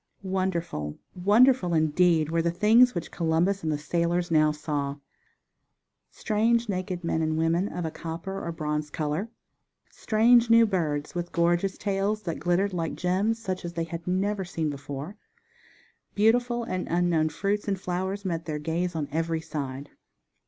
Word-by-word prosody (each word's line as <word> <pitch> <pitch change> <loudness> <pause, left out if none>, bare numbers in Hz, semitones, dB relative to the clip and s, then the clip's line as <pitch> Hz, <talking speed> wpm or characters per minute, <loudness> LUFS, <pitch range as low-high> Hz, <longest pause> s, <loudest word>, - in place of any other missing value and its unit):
Wonderful, 175 - -2 0.2
wonderful 205 0 +4
indeed 160 0 +3
were 165 0 +2
the 170 - +1
things 225 +8 +5
which 170 - -4
Columbus 175 +4 +1
and 160 - -1
the 150 - 0
sailors 170 +3 -1
now 155 -1 +4
saw! 145 -2 -3 1.1
Strange 230 +2 +1
naked 185 -2 -3
men 165 -1 0
and 155 0 0
women 165 +4 +1
of 175 -1 -4
a 160 - -3
copper, 170 +5 -6
or 170 - -3
bronze 150 -2 -3
color, 155 +8 -2 0.6
strange 230 +2 +4
new 230 0 +7
birds 155 -8 -1
with 175 0 -4
gorgeous 175 +3 +1
tails 205 +1 -1
that 165 -3 -4
glittered 175 +5 +1
like 165 -2 -2
gems 190 +5 0
such 190 -5 -4
as 170 0 -5
they 165 -1 -2
had 165 +1 -7
never 195 +2 0
seen 165 -4 -2
before; 140 +6 -7 1.0
beautiful 240 +3 +2
and 185 -5 -3
unknown 170 -2 +2
fruits 200 +7 -2
and 195 -2 -1
flowers 190 +2 -3
met 165 -2 -2
their 155 -2 -3
gaze 165 +3 -2
on 150 -3 -2
every 165 +1 -1
side. 140 -3 -6
175 Hz, 155 wpm, -27 LUFS, 160-195 Hz, 1.1 s, new